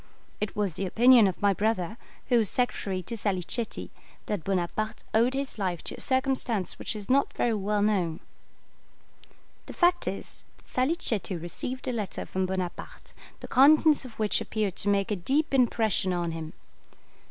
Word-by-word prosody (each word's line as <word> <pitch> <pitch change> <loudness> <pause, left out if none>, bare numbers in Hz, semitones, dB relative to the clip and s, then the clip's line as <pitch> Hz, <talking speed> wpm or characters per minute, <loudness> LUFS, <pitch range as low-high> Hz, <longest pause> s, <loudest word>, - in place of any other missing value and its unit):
It 210 - -3
was 205 -4 0
the 195 - -1
opinion 235 +2 +6
of 185 - -3
my 200 -1 +5
brother, 210 -1 -1 0.3
who 245 - +5
was 215 -4 +1
secretary 195 -7 -1
to 230 - -4
Salicetti, 205 +2 -2 0.3
that 205 -6 -3
Bonaparte 195 +4 -2
owed 235 +4 +3
his 275 -4 -3
life 180 -4 -2
to - - -4
a - - -13
circumstance 260 -6 -1
which - - -3
is 210 -2 -6
not 275 +2 +2
very 235 - +1
well 205 0 0
known. 185 -6 +1 1.5
The - - -8
fact 350 0 +2
is, - - -5
that - - -26
Salicetti 255 - 0
received 245 +10 -4
a - - +1
letter 215 -4 -2
from 185 0 -2
Bonaparte, 185 -2 -5 0.3
the - - -7
contents 300 +3 +5
of 255 -3 -10
which 215 -2 0
appeared 210 -4 -2
to 205 - 0
make 200 0 +1
a - - +2
deep 275 - 0
impression 225 -7 +2
on 175 -1 -1
him. 160 -1 -6
210 Hz, 165 wpm, -27 LUFS, 190-255 Hz, 1.5 s, opinion